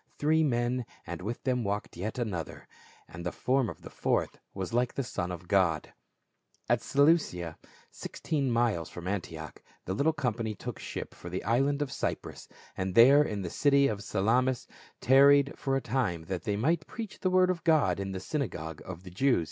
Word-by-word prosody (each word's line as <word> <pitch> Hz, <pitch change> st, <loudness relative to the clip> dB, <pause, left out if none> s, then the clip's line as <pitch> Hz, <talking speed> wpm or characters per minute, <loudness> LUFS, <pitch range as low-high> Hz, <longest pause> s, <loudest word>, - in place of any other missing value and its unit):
Three 160 Hz, +2 st, +3 dB
men, 120 Hz, -3 st, 0 dB, 0.2 s
and 85 Hz, 0 st, -6 dB
with 110 Hz, +6 st, -5 dB
them 125 Hz, -2 st, 0 dB
walked 100 Hz, 0 st, -3 dB
yet 105 Hz, +8 st, -4 dB
another, 100 Hz, -10 st, -4 dB, 0.4 s
"and 85 Hz, +1 st, -9 dB
the 90 Hz, -, -2 dB
form 130 Hz, -3 st, +1 dB
of -, -, -10 dB
the -, -, -10 dB
fourth -, -, -1 dB
was 95 Hz, +1 st, -5 dB
like 120 Hz, 0 st, +1 dB
the 135 Hz, -, -1 dB
Son 90 Hz, -7 st, -3 dB
of 90 Hz, 0 st, -7 dB
God." 90 Hz, -5 st, +1 dB, 0.7 s
At -, -, +2 dB
Seleucia, 140 Hz, -, +2 dB, 0.3 s
sixteen 140 Hz, -4 st, -2 dB
miles 115 Hz, -8 st, +1 dB
from 85 Hz, 0 st, -8 dB
Antioch, 85 Hz, -5 st, -5 dB, 0.2 s
the 95 Hz, -, -2 dB
little 140 Hz, +11 st, +2 dB
company 120 Hz, -7 st, -2 dB
took -, -, -7 dB
ship -, -, -6 dB
for 85 Hz, -, -9 dB
the 90 Hz, +2 st, -4 dB
island 140 Hz, +5 st, +2 dB
of 135 Hz, -, -7 dB
Cyprus, -, -, -4 dB, 0.3 s
and 95 Hz, -1 st, -3 dB
there 135 Hz, +5 st, +8 dB
in 105 Hz, -9 st, -2 dB
the 85 Hz, -, -4 dB
city 140 Hz, -1 st, +4 dB
of 105 Hz, -4 st, -3 dB
Salamis 120 Hz, +6 st, +1 dB, 0.4 s
tarried 140 Hz, +2 st, +6 dB
for 135 Hz, -2 st, -1 dB
a 135 Hz, -, 0 dB
time 110 Hz, -10 st, -1 dB
that 95 Hz, +2 st, -4 dB
the}' 105 Hz, -3 st, 0 dB
might 155 Hz, +9 st, +1 dB
preach 220 Hz, -2 st, -7 dB
the 185 Hz, -, +1 dB
word 185 Hz, 0 st, +4 dB
of 175 Hz, -2 st, -5 dB
God 145 Hz, -, +3 dB
in 95 Hz, 0 st, -3 dB
the 95 Hz, -, -4 dB
synagogues 90 Hz, -, -4 dB
of 95 Hz, -1 st, -8 dB
the 90 Hz, -, -10 dB
Jews. 130 Hz, +6 st, +3 dB
115 Hz, 190 wpm, -29 LUFS, 95-140 Hz, 0.7 s, there